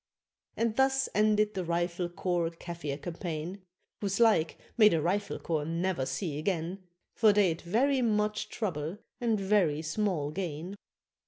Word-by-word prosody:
And 230 Hz, -1 st, 0 dB
thus 265 Hz, 0 st, +3 dB
ended 210 Hz, 0 st, +3 dB
the 190 Hz, -2 st, -2 dB
Rifle 175 Hz, +1 st, -1 dB
Corps 175 Hz, -2 st, -1 dB
Kafir 165 Hz, -4 st, -6 dB
campaign 170 Hz, +3 st, -5 dB, 0.4 s
Whose 195 Hz, 0 st, -1 dB
like 215 Hz, -9 st, +4 dB, 0.2 s
may 215 Hz, -3 st, +7 dB
the 165 Hz, -, +2 dB
Rifle 195 Hz, +6 st, -1 dB
Corps 155 Hz, -3 st, -1 dB
ne'er 165 Hz, -3 st, -1 dB
see 145 Hz, +3 st, -3 dB
again, 175 Hz, +2 st, -2 dB, 0.3 s
For 220 Hz, -2 st, +5 dB
they'd 190 Hz, -5 st, +2 dB
very 255 Hz, +9 st, +2 dB
much 210 Hz, -2 st, 0 dB
trouble 170 Hz, -4 st, -3 dB, 0.2 s
and 230 Hz, -4 st, +1 dB
very 190 Hz, -6 st, +2 dB
small 155 Hz, -3 st, -1 dB
gain. 175 Hz, +1 st, -4 dB
185 Hz, 140 wpm, -30 LUFS, 165-210 Hz, 0.4 s, may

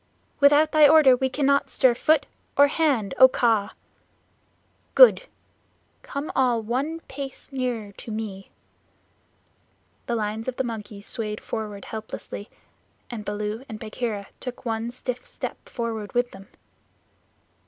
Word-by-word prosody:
"Without 290 Hz, +2 st, +5 dB
thy 305 Hz, -1 st, +7 dB
order 290 Hz, -4 st, +7 dB
we 265 Hz, +1 st, 0 dB
cannot 280 Hz, +1 st, +1 dB
stir 260 Hz, -3 st, +3 dB
foot 295 Hz, +4 st, +2 dB, 0.3 s
or 285 Hz, -, +8 dB
hand, 275 Hz, -, +1 dB
O 260 Hz, -, +11 dB
Kaa!" 225 Hz, -5 st, +1 dB, 1.2 s
"Good! -, -, +7 dB, 0.7 s
Come 280 Hz, +2 st, -5 dB
all 250 Hz, -3 st, +3 dB
one 275 Hz, +9 st, -2 dB
pace 275 Hz, -1 st, -8 dB
nearer 245 Hz, -6 st, -3 dB
to 200 Hz, -, -11 dB
me." 210 Hz, -3 st, -5 dB, 1.6 s
The 235 Hz, -, 0 dB
lines 220 Hz, +1 st, -3 dB
of 255 Hz, -, -2 dB
the 265 Hz, -, -1 dB
monkeys 210 Hz, -4 st, -7 dB
swayed 215 Hz, -2 st, -4 dB
forward 210 Hz, -3 st, -5 dB
helplessly, 220 Hz, -1 st, -7 dB, 0.6 s
and 225 Hz, -3 st, -5 dB
Baloo 210 Hz, +3 st, -4 dB
and 215 Hz, -1 st, -7 dB
Bagheera 215 Hz, -2 st, -4 dB
took 250 Hz, -1 st, -7 dB
one 225 Hz, 0 st, -2 dB
stiff 250 Hz, 0 st, -5 dB
step -, -, -7 dB
forward 225 Hz, -4 st, -4 dB
with 245 Hz, 0 st, +1 dB
them. 195 Hz, 0 st, -13 dB
240 Hz, 130 wpm, -25 LUFS, 215-270 Hz, 1.6 s, O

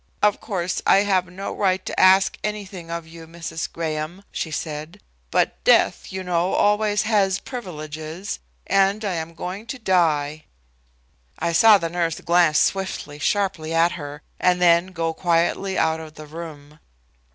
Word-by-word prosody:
"Of 210 Hz, -1 st, +3 dB
course 185 Hz, -5 st, -2 dB
I 195 Hz, -, +6 dB
have 190 Hz, -3 st, +1 dB
no 185 Hz, +3 st, -6 dB
right 190 Hz, -2 st, 0 dB
to -, -, -3 dB
ask 190 Hz, +1 st, +5 dB
anything 200 Hz, -5 st, -5 dB
of 170 Hz, -1 st, -4 dB
you, 165 Hz, 0 st, -12 dB
Mrs. 165 Hz, -1 st, -5 dB
Graham," 160 Hz, +3 st, -4 dB
she 160 Hz, -, -3 dB
said, 155 Hz, +4 st, -5 dB, 0.3 s
"but -, -, 0 dB
death, -, -, +3 dB
you 190 Hz, 0 st, -4 dB
know, 180 Hz, 0 st, 0 dB
always 210 Hz, 0 st, +2 dB
has 200 Hz, -4 st, +2 dB
privileges, 160 Hz, -, -6 dB, 0.3 s
and 195 Hz, +2 st, +2 dB
I 195 Hz, -, -1 dB
am 165 Hz, 0 st, -5 dB
going 190 Hz, +6 st, -6 dB
to 260 Hz, -, -5 dB
die." 155 Hz, -, +1 dB, 0.9 s
I 170 Hz, 0 st, -1 dB
saw 215 Hz, +5 st, +7 dB
the 170 Hz, -, -2 dB
nurse 170 Hz, -1 st, -1 dB
glance 170 Hz, -3 st, +3 dB
swiftly, 190 Hz, -6 st, -1 dB
sharply, 165 Hz, -2 st, 0 dB
at 165 Hz, +1 st, +4 dB
her, 145 Hz, -2 st, -7 dB, 0.2 s
and 180 Hz, 0 st, +3 dB
then 170 Hz, 0 st, +5 dB
go 165 Hz, -3 st, -2 dB
quietly 175 Hz, +3 st, 0 dB
out 160 Hz, 0 st, +1 dB
of 155 Hz, -1 st, -10 dB
the 155 Hz, -, -10 dB
room. 150 Hz, -2 st, -10 dB
175 Hz, 155 wpm, -23 LUFS, 160-195 Hz, 0.9 s, saw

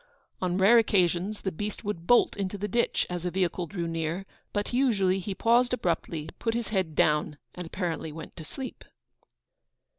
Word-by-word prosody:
On 180 Hz, -1 st, 0 dB
rare 205 Hz, +5 st, +7 dB
occasions 195 Hz, -1 st, +1 dB
the 190 Hz, -, -2 dB
beast 205 Hz, +7 st, -5 dB
would 190 Hz, -5 st, -4 dB
bolt 245 Hz, -, +5 dB
into 200 Hz, 0 st, -3 dB
the 205 Hz, +1 st, -2 dB
ditch 235 Hz, +2 st, +1 dB
as 175 Hz, -1 st, -4 dB
a 180 Hz, -, 0 dB
vehicle 180 Hz, -1 st, -1 dB
drew 170 Hz, 0 st, -3 dB
near; 165 Hz, +3 st, -2 dB, 0.3 s
but 205 Hz, +3 st, -2 dB
usually 200 Hz, -8 st, +3 dB
he 195 Hz, +1 st, -4 dB
paused 240 Hz, +4 st, +3 dB
abruptly, 170 Hz, -7 st, -1 dB
put 225 Hz, -1 st, 0 dB
his 235 Hz, -2 st, -2 dB
head 185 Hz, -7 st, -1 dB
down, 150 Hz, -1 st, +2 dB, 0.2 s
and 180 Hz, -2 st, -6 dB
apparently 165 Hz, -3 st, -3 dB
went 160 Hz, +2 st, -9 dB
to 160 Hz, -, -7 dB
sleep. 260 Hz, -, -7 dB
190 Hz, 175 wpm, -28 LUFS, 170-210 Hz, 0.3 s, rare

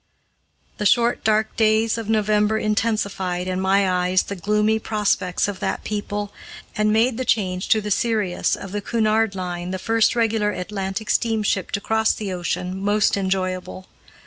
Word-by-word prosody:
The 210 Hz, -, -2 dB
short, 235 Hz, +2 st, +2 dB
dark 215 Hz, 0 st, +1 dB
days 220 Hz, 0 st, +2 dB
of 225 Hz, -2 st, -5 dB
November 215 Hz, 0 st, +2 dB
intensified, 200 Hz, -4 st, -1 dB
in 185 Hz, 0 st, -2 dB
my 195 Hz, +1 st, +3 dB
eyes, 180 Hz, 0 st, +2 dB
the 200 Hz, -, -6 dB
gloomy 210 Hz, +3 st, +1 dB
prospects 205 Hz, -5 st, 0 dB
of 200 Hz, -2 st, -5 dB
that -, -, -2 dB
people, 205 Hz, -1 st, -4 dB, 0.4 s
and 215 Hz, -1 st, +2 dB
made 225 Hz, +2 st, +2 dB
the -, -, 0 dB
change 185 Hz, -6 st, 0 dB
to 220 Hz, -, +4 dB
the 210 Hz, 0 st, -5 dB
Sirius 210 Hz, -4 st, +1 dB
of 195 Hz, -, -9 dB
the 205 Hz, +1 st, -3 dB
Cunard 220 Hz, -2 st, +1 dB
Line, 180 Hz, -1 st, -4 dB
the 190 Hz, -, -2 dB
first 225 Hz, +4 st, +2 dB
regular 225 Hz, -2 st, +1 dB
Atlantic 195 Hz, +2 st, -4 dB
steamship 215 Hz, -5 st, 0 dB
to 200 Hz, -, -1 dB
cross 220 Hz, +1 st, +1 dB
the 200 Hz, -3 st, -4 dB
ocean, 180 Hz, +1 st, -3 dB
most 205 Hz, +1 st, +2 dB
enjoyable. 185 Hz, -1 st, -2 dB
210 Hz, 160 wpm, -22 LUFS, 190-220 Hz, 0.4 s, to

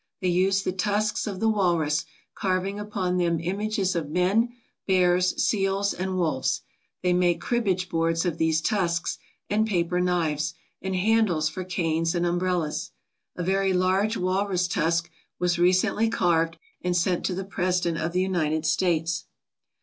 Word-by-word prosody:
They 185 Hz, -, 0 dB
use 190 Hz, +2 st, +2 dB
the 185 Hz, -, -1 dB
tusks 210 Hz, +3 st, 0 dB
of 195 Hz, -3 st, -4 dB
the 225 Hz, -, +1 dB
walrus, 170 Hz, -8 st, +1 dB, 0.3 s
carving 190 Hz, +1 st, -1 dB
upon 200 Hz, -4 st, -2 dB
them 170 Hz, -2 st, +1 dB
images 195 Hz, +2 st, -1 dB
of 160 Hz, -4 st, -2 dB
men, 190 Hz, +8 st, +2 dB, 0.4 s
bears, 180 Hz, -1 st, +3 dB
seals, 195 Hz, -1 st, +1 dB
and 185 Hz, +1 st, -3 dB
wolves. 155 Hz, -7 st, 0 dB, 0.4 s
They 180 Hz, -1 st, +3 dB
make 175 Hz, -1 st, +2 dB
cribbage 195 Hz, -6 st, 0 dB
boards 165 Hz, 0 st, 0 dB
of 170 Hz, -2 st, -2 dB
these 160 Hz, -1 st, +2 dB
tusks, 175 Hz, -4 st, 0 dB, 0.3 s
and 215 Hz, +2 st, +1 dB
paper 180 Hz, -3 st, 0 dB
knives, 160 Hz, -4 st, 0 dB, 0.3 s
and 190 Hz, 0 st, -2 dB
handles 185 Hz, -6 st, +2 dB
for 185 Hz, +4 st, -5 dB
canes 165 Hz, -2 st, -1 dB
and 175 Hz, 0 st, +1 dB
umbrellas. 175 Hz, -3 st, -1 dB, 0.5 s
A 175 Hz, -, -3 dB
very 195 Hz, +1 st, +1 dB
large 190 Hz, +4 st, +2 dB
walrus 185 Hz, 0 st, 0 dB
tusk 165 Hz, 0 st, 0 dB, 0.3 s
was 180 Hz, -1 st, 0 dB
recently 185 Hz, +5 st, +3 dB
carved 165 Hz, -5 st, +1 dB, 0.2 s
and 180 Hz, 0 st, 0 dB
sent 175 Hz, 0 st, +1 dB
to 185 Hz, -, -1 dB
the 190 Hz, +1 st, -4 dB
President 180 Hz, -3 st, -1 dB
of 165 Hz, -, -1 dB
the 180 Hz, +1 st, +1 dB
United 160 Hz, -4 st, 0 dB
States. 165 Hz, 0 st, +1 dB
180 Hz, 150 wpm, -26 LUFS, 170-195 Hz, 0.5 s, bears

